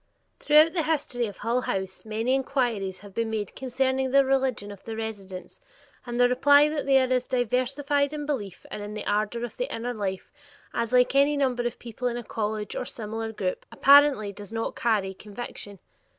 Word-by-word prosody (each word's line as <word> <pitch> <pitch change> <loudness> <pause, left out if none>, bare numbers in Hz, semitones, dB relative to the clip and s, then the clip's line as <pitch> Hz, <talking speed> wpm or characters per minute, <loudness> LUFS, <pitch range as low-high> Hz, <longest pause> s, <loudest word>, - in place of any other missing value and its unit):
Throughout 305 +2 +5
the 350 - +1
history 285 -7 -1
of 205 - -9
Hull 235 +3 0
House 190 -3 -4
many 225 +4 -1
inquiries 240 -9 -1
have 205 -1 -13
been 230 +1 -1
made 215 -3 -3
concerning 260 0 0
the 275 +1 +5
religion 260 -6 0
of 200 - -12
the 225 - -6
residents, 200 -4 -7 0.5
and 240 0 -3
the 245 - +6
reply 285 +4 +5
that 300 -2 -3
they 270 -1 +6
are 260 0 +1
as 250 0 0
diversified 270 +4 0
in 300 -1 -4
belief 210 -11 -4
and 210 - -5
in 205 +1 -6
the 210 - -5
ardor 215 +3 0
of 240 - -11
the - - -3
inner 245 +2 -3
life 195 -4 -4 0.4
as 230 0 -1
any 250 0 +6 0.4
like - - -1
number 250 -3 +1
of 240 - -6
people 240 +1 -5
in 240 -1 -2
a 240 - -5
college 215 -2 -3
or - - -2
similar 225 -1 -5
group, 190 -4 -3
apparently 280 -7 +5
does 205 +1 -10
not 225 0 -3
carry 210 -5 0
conviction. 205 0 -8
240 Hz, 195 wpm, -26 LUFS, 210-265 Hz, 0.5 s, the